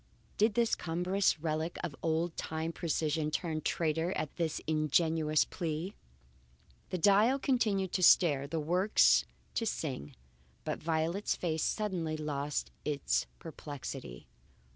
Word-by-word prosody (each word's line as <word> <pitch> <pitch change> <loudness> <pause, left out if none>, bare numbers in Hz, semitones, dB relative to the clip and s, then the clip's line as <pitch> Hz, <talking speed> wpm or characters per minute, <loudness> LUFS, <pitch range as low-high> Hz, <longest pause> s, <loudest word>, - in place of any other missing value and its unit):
Did 215 0 +3
this 235 -1 +2
cumbrous 180 +2 +1
relic 160 +1 -2
of 165 -5 -4
old 165 +1 0
time 160 +1 -3
precision 155 -2 -1
turn 155 0 -2
traitor 165 +3 0
at 155 -1 -4
this 165 -3 -1
ingenuous 155 0 +2
plea? 170 +2 -4 1.0
The 185 - -2
dial 205 +9 +5
continued 215 -9 +1
to 185 - -1
stare, 145 -6 +5
the 160 +2 -2
works 180 +7 +4 0.3
to 225 - -1
sing, 130 - -4 0.5
but - - -3
Violet's 165 +5 0
face 160 -3 -2
suddenly 175 -7 -1
lost 150 -1 -3
its 145 -2 0
perplexity. 145 - -8
160 Hz, 120 wpm, -32 LUFS, 155-185 Hz, 1.0 s, dial